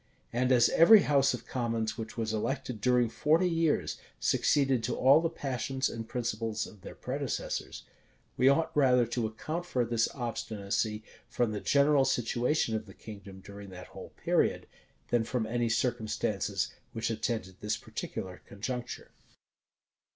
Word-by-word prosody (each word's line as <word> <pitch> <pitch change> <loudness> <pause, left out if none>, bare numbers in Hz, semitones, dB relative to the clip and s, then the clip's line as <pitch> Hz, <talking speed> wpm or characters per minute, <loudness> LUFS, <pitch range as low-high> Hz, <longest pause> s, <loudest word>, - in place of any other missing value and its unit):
And 125 +2 +1
as 120 -2 +6
every 205 +6 +8
house 140 -2 +3
of - - -11
commons 115 -3 -2
which 110 0 -7
was 110 -1 -1
elected 115 0 -3
during 125 0 +3
forty 160 +9 +2
years, 155 - +1 0.2
succeeded 135 -5 +2
to 120 - -1
all 140 +5 +6
the 165 - 0
passions 135 -3 -2
and 115 -1 -6
principles 115 -2 -2
of 105 - -14
their - - -9
predecessors, - - -4 0.5
we 130 - +5
ought 160 +4 +1
rather 125 -4 +4
to 115 0 -1
account 155 +10 -4
for 125 -7 0
this 115 -1 +1
obstinacy 110 -3 -2 0.3
from 120 -3 0
the 105 - -3
general 140 0 +4
situation 120 0 +1
of 110 0 -4
the 95 - -13
kingdom 100 -3 -11
during 100 0 -10
that 90 0 -10
whole 95 - -9
period, - - +1 0.4
than 120 -2 +2
from 115 0 -2
any 120 +1 0
circumstances 115 -2 -1 0.2
which 115 0 -2
attended 110 -4 -3
this 105 - -1
particular 90 -1 -6
conjuncture. 120 +4 -5
120 Hz, 150 wpm, -30 LUFS, 110-135 Hz, 0.5 s, every